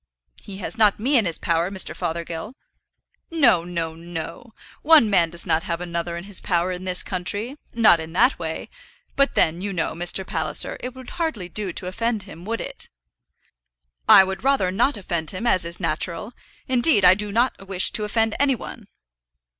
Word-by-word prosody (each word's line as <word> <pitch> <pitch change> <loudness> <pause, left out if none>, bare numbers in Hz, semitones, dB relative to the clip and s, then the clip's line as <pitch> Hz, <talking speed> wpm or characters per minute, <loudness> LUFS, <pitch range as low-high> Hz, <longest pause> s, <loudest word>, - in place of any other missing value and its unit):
"He 195 - -10
has 200 - -7
not 210 -2 +4
me 265 +7 +1
in 230 -5 +4
his 165 - 0
power, 170 +1 0
Mr. 190 -1 -3
Fothergill." 170 +6 -5 0.7
"No, 250 - +3
no, 170 -2 -4
no. 170 +8 -8 0.3
One 300 -9 +5
man 170 -4 +3
does 170 +1 -4
not 165 -2 +1
have 170 0 -2
another 170 -1 -4
in 170 - -7
his 200 -1 -3
power 175 0 0
in 180 +1 -6
this 180 -1 +2
country, 200 - -3 0.2
not 220 -7 +6
in 160 0 -7
that 245 +9 +3
way; - - -5 0.5
but 275 0 +2
then 165 +2 +2
you 200 +1 -3
know, 180 -3 -2
Mr. 175 +3 +1
Palliser, 160 -4 +1
it 250 0 -7
would 260 -1 -11
hardly 220 - -3
do 200 +1 -1
to 180 - -6
offend 220 +3 -2
him; 180 -3 -12
would 230 +2 -3
it?" - - -7 1.2
"I - - +10
would 190 +3 -5
rather 270 -9 +2
not 235 +6 +1
offend 170 -5 -3
him, 190 +5 -5
as 185 -7 +2
is 170 0 -5
natural. 185 +5 -2 0.3
Indeed, 250 - +3
I 180 - +9
do 205 +1 -4
not 230 -3 0
wish 185 -1 +2
to 215 - +3
offend 220 +1 0
any 275 -1 +3
one." - - -10
190 Hz, 185 wpm, -22 LUFS, 170-230 Hz, 1.2 s, I